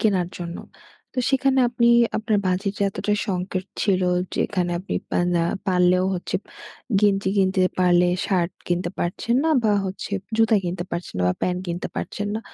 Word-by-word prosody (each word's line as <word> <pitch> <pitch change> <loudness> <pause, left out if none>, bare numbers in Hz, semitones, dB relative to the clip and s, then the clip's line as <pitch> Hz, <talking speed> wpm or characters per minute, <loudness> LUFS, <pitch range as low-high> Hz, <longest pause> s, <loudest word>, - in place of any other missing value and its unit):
কেনার 190 -5 +2
জন্য। 170 -1 -5 0.6
তো - - -4
সেখানে 270 0 +2
আপনি 235 0 +2 0.3
আপনার 215 -1 +1
বাজেটে 200 +3 -1
এতটা 205 +2 -1
সংকেট 185 0 -2 0.2
ছিল, 190 -3 +2 0.3
যেখানে 180 -3 0
আপনি 185 - -5 0.2
পা - - +1 0.2
না 165 - +2 0.2
পারলেও 180 0 +3
হচ্ছে, 180 - -2 0.6
গেঞ্জি 200 -2 +2
কিনতে 190 -1 +3 0.2
পারলে, 180 -1 +4 0.2
শার্ট 180 -2 +1 0.2
কিনতে 175 0 0
পারছেন 185 +7 -1
না 320 - +3
বা 215 - +4
হচ্ছে 190 +2 -5 0.2
জুতা 225 -1 +4
কিনতে 175 0 -3
পারছেন 170 +1 -5
না - - +1
বা 90 - +1
প্যান্ট 180 0 0
কিনতে 175 0 -3
পারছেন 205 0 -3
না। 220 - -2
185 Hz, 165 wpm, -23 LUFS, 180-205 Hz, 0.6 s, পারলে